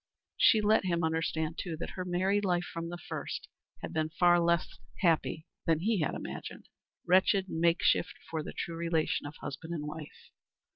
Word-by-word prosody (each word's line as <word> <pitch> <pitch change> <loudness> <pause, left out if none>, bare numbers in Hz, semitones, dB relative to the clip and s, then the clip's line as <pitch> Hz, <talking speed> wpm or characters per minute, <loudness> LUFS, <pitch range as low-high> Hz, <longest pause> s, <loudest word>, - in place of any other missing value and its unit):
She 220 - +5
let 210 -1 +3
him 170 -2 +1
understand, 160 0 -1
too, 165 -3 -4
that - - -5
her 185 - -4
married 190 +3 +1
life, 175 -2 +1
from 170 -1 -5
the 175 - -5
first, 175 - -5 0.4
had - - -5
been 155 0 0
far 175 +2 +4
less 170 -1 +1 0.2
happy 165 -2 +2 0.2
than 165 -1 +3
he 215 +1 +2
had 155 - 0
imagined - - -7 0.4
wretched 190 +2 +4
makeshift 170 +1 +2
for 160 -1 -2
the - - -6
true 170 - -4
relation 165 -3 0
of 145 - -9
husband 160 +5 -5
and 150 -2 -4
wife. 150 0 -9
170 Hz, 175 wpm, -31 LUFS, 160-180 Hz, 0.4 s, She